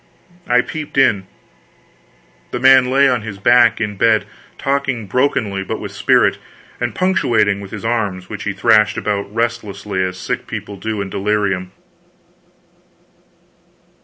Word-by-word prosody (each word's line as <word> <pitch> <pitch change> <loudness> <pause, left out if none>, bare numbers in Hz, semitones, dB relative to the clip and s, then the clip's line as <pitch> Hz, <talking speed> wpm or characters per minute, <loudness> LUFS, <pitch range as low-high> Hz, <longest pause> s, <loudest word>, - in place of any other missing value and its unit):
I 125 0 +4
peeped 150 +1 -7
in. 105 -8 +3 1.2
The 125 - -4
man 130 0 +6
lay 140 +2 +4
on 125 -3 +1
his 105 -2 -7
back 120 +3 +4
in 105 -2 -3
bed, 110 0 +3 0.3
talking 135 -4 -1
brokenly 105 -3 0
but - - -4
with - - -6
spirit, - - +2 0.4
and 120 0 -3
punctuating 110 - +1
with 100 - -9
his 105 +1 -7
arms, 105 -6 -2
which 105 -1 -7
he 105 - -1
thrashed 105 +1 +3
about, 100 -1 -2
restlessly, 105 -4 -2
as 90 0 -3
sick 90 - -4
people 100 - -6
do 105 +1 -4
in 95 -1 -5
delirium. 100 -2 -1
105 Hz, 135 wpm, -18 LUFS, 100-120 Hz, 1.2 s, man